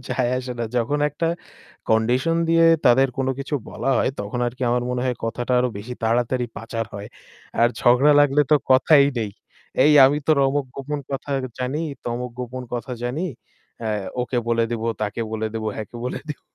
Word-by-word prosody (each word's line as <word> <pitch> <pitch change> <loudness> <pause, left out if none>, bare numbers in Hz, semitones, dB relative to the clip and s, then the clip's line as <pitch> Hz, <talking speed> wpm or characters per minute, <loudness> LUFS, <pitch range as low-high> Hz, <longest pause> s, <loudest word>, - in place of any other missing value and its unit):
যায় 125 -1 0
আসে 130 0 -5
না। 120 - -1
যখন 135 +5 +1
একটা 150 +3 -3 0.6
কন্ডিশন 125 +9 +2
দিয়ে 165 0 +5 0.2
তাদের 130 +2 +5
কোন 135 - 0
কিছু 140 +2 -4 0.2
বলা 135 - -2
হয় - - +2
তখন 105 +4 -4
আরকি 125 +2 -5
আমার 120 0 +1
মনে 125 0 -1
হয় 125 - -1
কথাটা 120 +2 -2
আরও 125 - +1
বেশি 120 +5 -7
তাড়াতাড়ি 120 +2 +1
পাচার 115 0 -4
হয়। 100 0 -7 0.5
আর 120 - +6
ঝগড়া 130 +5 +5
লাগলে 145 0 +4
তো 150 - +7
কথাই 140 +2 +6
নেই। 110 -2 -2 0.5
"এই 150 - +6
আমি 145 +3 +4
তোর 155 -2 +4
অমুক 140 0 -1
গোপন 145 +2 -4
কথা 135 +1 -4 0.3
জানি, 130 +4 -2 0.3
তমুক 120 +1 -3
গোপন 125 +1 -5
কথা 125 +2 -4
জানি। 130 +8 -2 0.6
অ্যা 115 - -3 0.3
ওকে 125 0 -1
বলে 115 -1 +2
দিবো, 115 -1 -2 0.2
তাকে 105 +2 -3
বলে 110 0 -1
দিবো, 110 -1 -2
হ্যাঁ, 110 - -5
কে - - -9
বলে 125 - -4
দিব।" 150 - -5
125 Hz, 185 wpm, -22 LUFS, 115-140 Hz, 0.6 s, তো